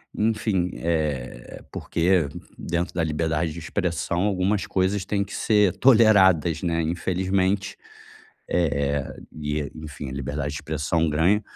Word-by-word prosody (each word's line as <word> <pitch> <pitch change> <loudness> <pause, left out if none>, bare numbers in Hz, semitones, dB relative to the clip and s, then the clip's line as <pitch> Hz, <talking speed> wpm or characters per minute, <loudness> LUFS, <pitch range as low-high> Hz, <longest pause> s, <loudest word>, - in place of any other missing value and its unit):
enfim, 105 -4 0
eh, 75 -7 -3
porque 85 -2 +1 0.3
dentro 85 +1 -2
da 85 - 0
liberdade 80 +1 -1
de - - -10
expressão, 85 0 -2
algumas 95 0 0
coisas 95 +1 0
têm 100 +1 -1
que 100 - -10
ser 105 -4 +3
toleradas, 95 - +5
né, 85 -2 0
infelizmente, 95 +3 0 0.8
eh 70 -4 +1
eh, - - -9 0.2
e, 75 -1 -3
enfim, 75 -2 -7
a - - -6
liberdade 70 +2 -3
de - - -7
expressão 80 +2 0
ganha, 85 +8 +2
85 Hz, 130 wpm, -24 LUFS, 75-95 Hz, 0.8 s, toleradas